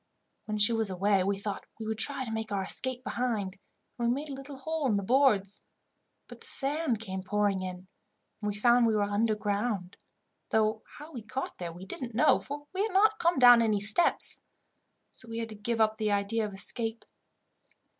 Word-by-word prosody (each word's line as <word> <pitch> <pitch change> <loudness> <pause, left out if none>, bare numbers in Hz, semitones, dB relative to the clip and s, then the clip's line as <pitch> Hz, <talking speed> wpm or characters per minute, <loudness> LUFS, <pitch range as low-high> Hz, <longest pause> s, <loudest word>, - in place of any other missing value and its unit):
When 215 -1 -3
she 210 +3 +3
was 225 -2 0
away, 190 +1 +1
we 200 +1 0
thought 200 0 -5
we 220 - -5
would 220 0 -3
try 270 0 +3
to 225 - -6
make 220 -1 -4
our 195 -1 -1
escape 255 +5 -3
behind, 215 -8 -2 0.4
and 235 - 0
we - - +3
made 295 +2 -5
a - - -5
little 275 +1 -9
hole 315 +1 -2
in 215 -5 +2
the 200 - -2
boards; 210 -5 +2 0.6
but - - -13
the - - -11
sand 275 -4 +1
came 190 -3 -5
pouring 200 0 0
in, 185 0 -7 0.5
and 210 - -1
we 205 - -3
found 240 +2 +4
we 220 - +1
were 210 - +2
underground, 205 -2 -1 0.5
though 215 0 +1 0.2
how 300 +2 -11
we 250 -6 -7
got 260 +5 -6
there 175 -2 -5
we 175 +3 -10
didn't 240 - -7
know, 245 - +4
for 290 +1 -7
we 380 - -1
had 425 -2 -1
not 430 +3 +4
come 340 -2 +2
down 245 -2 +8
any 215 -3 +2
steps. 215 +12 +4 0.7
So 230 - -8
we 225 - -5
had 230 -1 -4
to 215 - -8
give 225 +3 -3
up 220 0 +2
the 215 -1 0
idea 205 +2 0
of 205 - -10
escape." 225 +3 -2
220 Hz, 205 wpm, -29 LUFS, 205-255 Hz, 0.7 s, down